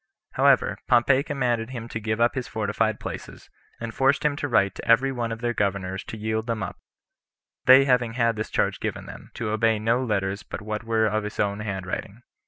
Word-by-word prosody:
However, - - +3
Pompey 125 +2 +4
commanded 125 -6 -1
him 120 -3 -6
to 115 - -4
give 110 +1 -2
up 120 +1 +3
his 130 -3 -4
fortified 110 0 -1
places, - - -8 0.3
and 115 -1 -5
forced 135 +4 +2
him 145 -1 +2
to 145 - -2
write 100 -7 +2
to - - -9
every 135 +3 +4
one 120 -3 -3
of 115 0 -5
their 120 0 0
governors 95 -2 -2
to 110 - -7
yield 110 +1 -2
them 115 -2 -2
up; - - -6 0.9
they 130 +2 +8
having 125 -4 +2
had 115 -2 +1
this 110 0 -4
charge - - 0
given - - -4
them, - - -11
to 110 -2 -3
obey 110 0 +2
no 115 +4 +1
letters 100 -3 -1
but - - -7
what 105 +1 -4
were 115 -1 +1
of 110 0 +1
his 105 - -7
own 100 0 0
hand 100 -3 -4
writing. 105 +5 -6
115 Hz, 210 wpm, -25 LUFS, 105-120 Hz, 0.9 s, they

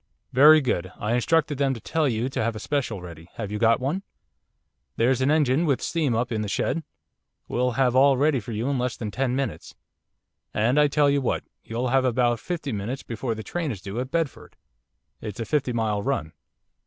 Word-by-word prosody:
'Very 150 +4 +8
good. 95 -8 -1
I 105 +2 -1
instructed 150 +3 +1
them 135 -2 +2
to - - -8
tell 155 +6 0
you 115 +1 -1
to 135 - -2
have 115 0 -1
a - - -5
special 120 -10 -2
ready, 85 -1 -11
have 105 -3 -5
you 105 - -3
got 115 0 +4
one?' 145 +9 -1 0.9
'There's 125 +2 +2
an 130 - +2
engine 150 -1 +3
with 140 -6 +1
steam 150 -8 0
up 120 +2 -1
in 110 -2 -1
the 105 - -3
shed, 165 +9 -1 0.6
we'll 125 0 0
have 125 0 +2
all 135 0 +5
ready 145 0 +3
for 115 +1 -8
you 110 +3 -2
in 140 -2 0
less 125 0 -2
than 105 -3 -4
ten 130 +2 -1
minutes. 135 0 -4 0.8
And 120 +7 +3
I 150 - +6
tell 145 0 +3
you 140 0 +2
what, 130 - -1 0.2
you'll 120 +3 -2
have 135 +1 +3
about 120 -2 +2
fifty 160 -3 -4
minutes 110 +5 -4
before 115 0 -3
the 110 - -7
train 165 - -3
is 110 -7 -4
due 100 +5 -5
at 130 +1 -3
Bedford. 165 -2 -3 0.7
It's 105 -1 -6
a 115 - -2
fifty 135 +1 0
mile 110 -3 0
run. 120 - -2
125 Hz, 210 wpm, -25 LUFS, 115-140 Hz, 0.9 s, Very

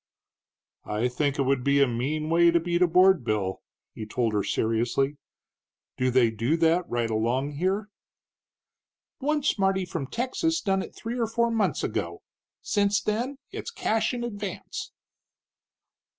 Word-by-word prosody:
"I 110 +4 0
think 140 +3 -1
it 140 - +2
would 135 -1 +1
be 140 +1 +3
a 140 - +6
mean 140 +6 -2
way 170 +1 +6
to 170 0 +3
beat 175 +1 -1
a 180 - +6
board 185 -2 +5
bill," 105 -4 -1 0.3
he 110 - -7
told 115 0 0
her, 105 -1 +1
seriously. 120 +7 0 0.8
"Do 130 0 +1
they 125 -2 +4
do 115 +9 0
that 165 +2 +2
right 120 -1 0
along 120 +6 0
here?" 190 +5 0 1.3
"One 295 +1 0
smarty 195 -7 +1
from 165 -6 -4
Texas 260 - -1
done 195 -1 0
it - - -9
three 235 +2 -5
or 230 - +1
four 235 +1 +1
months 225 -2 0
ago. - - -3 0.4
Since 205 -1 +2
then 240 +6 -2
it's - - -5
cash 225 - 0
in 245 -1 -4
advance." 205 -4 -5
165 Hz, 150 wpm, -26 LUFS, 125-210 Hz, 1.3 s, a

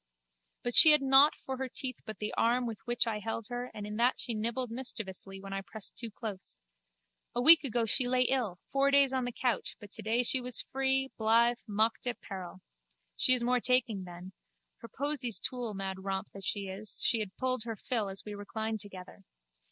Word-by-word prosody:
But 245 - -3
she 315 -2 +10
had 300 -2 +4
nought 270 +2 +6
for 265 0 -4
her 265 0 -4
teeth 255 0 -4
but 215 - -6
the 210 - -4
arm 245 +2 +1
with 225 -3 -5
which 240 0 0
I 220 -2 -2
held 225 +1 -4
her 245 +1 -5
and 210 -1 -8
in 210 0 -6
that 245 +2 +2
she 240 - -2
nibbled 235 +3 -2
mischievously 200 -6 -6
when 195 0 -8
I 195 - -3
pressed 200 +2 -6
too 235 - -4
close. 205 - -8 0.8
A 240 - 0
week 325 +3 +10
ago 240 -3 -1
she 245 +3 +3
lay 250 0 +3
ill, 245 -8 0
four 275 0 +2
days 280 -1 +4
on 260 -1 -1
the 245 - -3
couch, 245 0 -2
but 205 -1 -13
today 225 +3 -1
she 255 +2 +2
was 250 -1 +2
free, 265 0 0
blithe, 235 +2 +3
mocked 220 +4 0
at 245 - -3
peril. 185 -1 -9 0.5
She 255 - +6
is 245 - -2
more 250 +1 +2
taking 245 -5 +1
then. 180 +1 -11 0.4
Her 230 - -11
posies 265 -4 -2
too! 245 -3 -3
Mad 190 -1 -5
romp 195 -1 -4
that 195 - -8
she 205 - -1
is, 195 +3 -5
she 230 - +3
had 205 -3 -6
pulled 255 -2 0
her 225 -1 -4
fill 215 -1 -2
as 195 0 -7
we 210 - -7
reclined 220 +2 -4
together. 190 -1 -8
230 Hz, 205 wpm, -30 LUFS, 205-255 Hz, 0.8 s, she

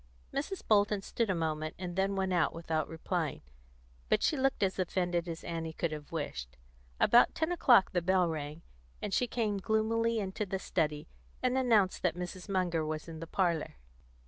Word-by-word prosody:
Mrs. 330 +7 -3
Bolton 205 -1 +3
stood 230 0 -1
a 190 - +2
moment, 155 -1 -2
and 180 -1 -5
then 195 +1 +1
went 190 -1 0
out 170 -2 +2
without 160 -2 -1
replying; 160 - -3 0.7
but - - +3
she - - +3
looked 270 -5 +1
as 190 0 0
offended 175 -1 0
as 165 0 -6
Annie 165 -1 -4
could 170 0 -2
have 150 -1 -7
wished. 65 - -5 0.4
About 240 - +5
ten 320 +2 0
o'clock 245 - +5
the 175 - +1
bell 185 0 +3
rang, 155 0 -5 0.4
and 205 - -4
she 250 - +2
came 215 -4 -1
gloomily 225 +2 +1
into 195 0 -2
the 195 -1 -2
study, 150 -5 -1 0.4
and 255 0 +2
announced 225 -8 +3
that 175 -3 +1
Mrs. 180 +2 -6
Munger 180 -4 +1
was 155 +1 -4
in 160 -1 -7
the 165 - -6
parlour. 170 -3 0
185 Hz, 180 wpm, -32 LUFS, 165-210 Hz, 0.7 s, About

